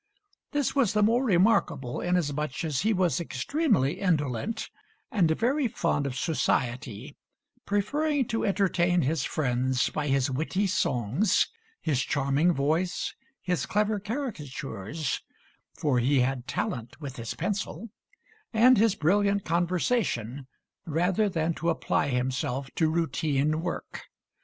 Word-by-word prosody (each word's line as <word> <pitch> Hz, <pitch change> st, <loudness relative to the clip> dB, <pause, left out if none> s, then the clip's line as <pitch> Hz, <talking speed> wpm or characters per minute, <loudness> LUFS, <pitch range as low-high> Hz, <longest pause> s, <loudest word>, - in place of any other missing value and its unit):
This 290 Hz, -1 st, -1 dB
was 255 Hz, -8 st, +3 dB
the 210 Hz, -1 st, +3 dB
more 235 Hz, +5 st, +3 dB
remarkable 185 Hz, -, +2 dB
inasmuch 150 Hz, -6 st, -1 dB
as 150 Hz, -4 st, -1 dB
he 220 Hz, -, +2 dB
was 185 Hz, -4 st, +2 dB
extremely 215 Hz, -, 0 dB
indolent 160 Hz, -, -1 dB, 0.4 s
and 185 Hz, -7 st, +3 dB
very 250 Hz, -, +1 dB
fond 145 Hz, -9 st, 0 dB
of 130 Hz, -2 st, -4 dB
society, 125 Hz, -, -1 dB, 0.5 s
preferring 280 Hz, +8 st, +1 dB
to 225 Hz, -, -1 dB
entertain 180 Hz, -4 st, +2 dB
his 145 Hz, +1 st, 0 dB
friends 130 Hz, -2 st, 0 dB
by 150 Hz, -1 st, -2 dB
his 135 Hz, -1 st, +1 dB
witty 160 Hz, +9 st, 0 dB
songs, 170 Hz, -, +1 dB, 0.3 s
his 140 Hz, -5 st, +1 dB
charming 140 Hz, +5 st, +2 dB
voice, 160 Hz, +4 st, 0 dB, 0.3 s
his 180 Hz, -2 st, -1 dB
clever 210 Hz, 0 st, +1 dB
caricatures 155 Hz, -, -4 dB, 0.5 s
for 140 Hz, -5 st, +1 dB
he 130 Hz, +2 st, +3 dB
had 125 Hz, 0 st, -1 dB
talent 120 Hz, -4 st, -3 dB
with 140 Hz, -4 st, -7 dB
his 115 Hz, -1 st, -5 dB
pencil 200 Hz, +2 st, -3 dB, 0.6 s
and 240 Hz, +2 st, +6 dB
his 220 Hz, -2 st, +4 dB
brilliant 200 Hz, +5 st, +2 dB
conversation, 170 Hz, -, 0 dB, 0.4 s
rather 180 Hz, +6 st, +1 dB
than 165 Hz, -2 st, 0 dB
to 170 Hz, +1 st, -2 dB
apply 165 Hz, -3 st, 0 dB
himself 130 Hz, +1 st, -2 dB
to 160 Hz, -2 st, +2 dB
routine 155 Hz, -2 st, 0 dB
work. 175 Hz, 0 st, -5 dB
165 Hz, 125 wpm, -27 LUFS, 135-205 Hz, 0.6 s, and